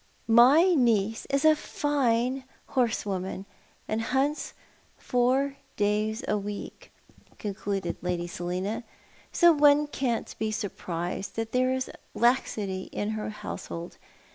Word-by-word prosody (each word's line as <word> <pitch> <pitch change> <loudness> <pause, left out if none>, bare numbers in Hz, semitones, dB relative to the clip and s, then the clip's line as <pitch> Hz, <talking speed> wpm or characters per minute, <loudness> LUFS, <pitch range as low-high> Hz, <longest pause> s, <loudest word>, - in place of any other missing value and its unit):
"My 265 +11 +6
niece 225 -5 +2
is 275 +2 +1
a 310 0 +7
fine 265 -4 0 0.3
horsewoman, 200 -6 -1 0.4
and 215 +1 -1
hunts 270 +6 -1 0.4
four 265 +3 +1 0.2
days 215 +3 0
a 210 - +1
week," 205 0 -7 0.5
concluded 195 -3 -3
Lady 175 -1 -2
Selina, 180 +6 -3 0.3
" - - -28
so 345 -1 +6
one 295 0 +5
can't 260 -5 -2
be 220 - 0
surprised 185 -3 -4
that 225 0 -3
there 255 0 +2
is 260 0 -2 0.2
laxity 215 -6 +1
in 205 - -2
her 215 -1 -3
household. 170 -4 -7
225 Hz, 115 wpm, -27 LUFS, 200-265 Hz, 0.5 s, a